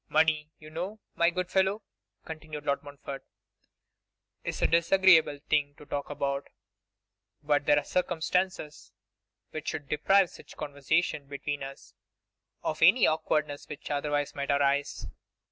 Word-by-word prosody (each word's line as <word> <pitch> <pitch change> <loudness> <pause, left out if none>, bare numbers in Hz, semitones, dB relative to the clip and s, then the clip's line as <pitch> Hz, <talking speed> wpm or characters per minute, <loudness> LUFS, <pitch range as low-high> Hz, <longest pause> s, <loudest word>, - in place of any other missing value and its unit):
'Money, 155 -1 +3
you 155 0 -13
know, 185 +7 -4
my 170 - +3
good 180 +1 -3
fellow,' 195 +3 +2 0.4
continued 155 -2 -7
Lord 140 - +1
Montfort, 140 -1 -8 1.2
'is - - -3
a - - +6
disagreeable 170 -2 +5
thing 145 -1 +1
to 150 - -14
talk 140 0 -4
about; 140 -1 -2 1.0
but 145 -1 +1
there 145 - +6
are 145 - +2
circumstances 180 -2 -1 0.6
which 155 - -6
should 145 - -3
deprive 180 +6 +3
such - - -14
conversation 145 +1 -1
between 145 +1 -4
us 135 0 -9 0.7
of 155 - -2
any 195 +9 +7
awkwardness 150 -2 0
which 150 - -7
otherwise 145 0 -1
might 140 0 -4
arise. 140 0 +1
150 Hz, 130 wpm, -29 LUFS, 145-170 Hz, 1.2 s, any